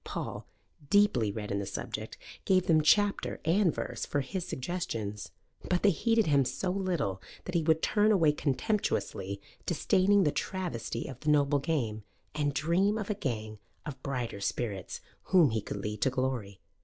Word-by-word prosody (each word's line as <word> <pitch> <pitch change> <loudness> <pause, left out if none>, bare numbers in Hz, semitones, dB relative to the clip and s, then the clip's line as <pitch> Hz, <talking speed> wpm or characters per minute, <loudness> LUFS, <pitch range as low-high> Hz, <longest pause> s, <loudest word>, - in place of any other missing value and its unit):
Paul, - - -5 0.4
deeply 200 - +4
read 105 0 -5
in 100 - 0
the 100 - -3
subject, 100 - -5 0.3
gave 185 -1 +3
them 160 -2 +4
chapter 205 +6 +2
and 175 +2 +3
verse - - -4
for 145 - -1
his 175 +7 -4
suggestions. 115 - -4 0.4
But 180 -1 +1
they 205 - +6
heeded 225 +5 +2
him 140 -3 +4
so 180 +8 -2
little 175 - -1 0.2
that 180 - -5
he 170 - +2
would 160 0 +2
turn 210 0 +3
away 165 -7 +5
contemptuously, 135 - -1 0.3
disdaining 195 +2 +3
the 150 - +2
travesty 165 -13 -3
of 130 -3 -8
the 155 - -2
noble 145 -1 +3
game, 125 -8 -1 0.3
and 145 -1 0
dream 175 +8 +2
of 215 -1 -2
a - - +2
gang 110 - -4 0.3
of 135 -3 -7
brighter 125 -6 -3
spirits 100 -3 -3 0.2
whom 175 -9 +5
he 110 -1 0
could 100 - -5
lead 105 +1 -4
to 130 - +4
glory. 125 -7 -3
150 Hz, 170 wpm, -30 LUFS, 115-185 Hz, 0.4 s, they